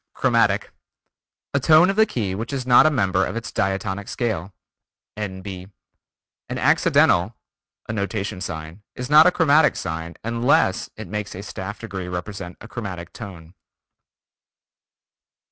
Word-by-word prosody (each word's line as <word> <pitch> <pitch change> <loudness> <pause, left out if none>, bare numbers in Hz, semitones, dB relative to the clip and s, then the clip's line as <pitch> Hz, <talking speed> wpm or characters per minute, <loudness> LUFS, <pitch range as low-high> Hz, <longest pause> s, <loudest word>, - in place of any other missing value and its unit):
Chromatic: - - +2 0.8
A 140 - +3
tone 160 +7 +6
of - - -5
the 220 +1 +4
key 105 - -2
which 110 +7 -4
is 135 -3 -3
not 125 +4 +7
a - - +5
member 95 -9 +1
of - - -3
its 115 -1 -5
diatonic 95 +1 -2
scale. 105 -6 -2 0.6
(N.B.) 95 -2 -6 0.8
An - - -3
accidental 95 +6 +3 0.5
(a 110 - -3
notation 100 -2 -3
sign) 80 +1 -6
is 125 +2 -6
not 155 +2 +8
a - - +5
chromatic 155 -2 +4
sign 80 +1 -5
unless 115 -3 +1
it 110 -3 -7
makes 105 +2 -5
a 95 - -7
staff 100 +1 -6
degree 95 -5 -6
represent 90 0 -6
a - - -11
chromatic 95 -8 -7
tone. 90 -6 -10
100 Hz, 140 wpm, -22 LUFS, 95-120 Hz, 0.8 s, not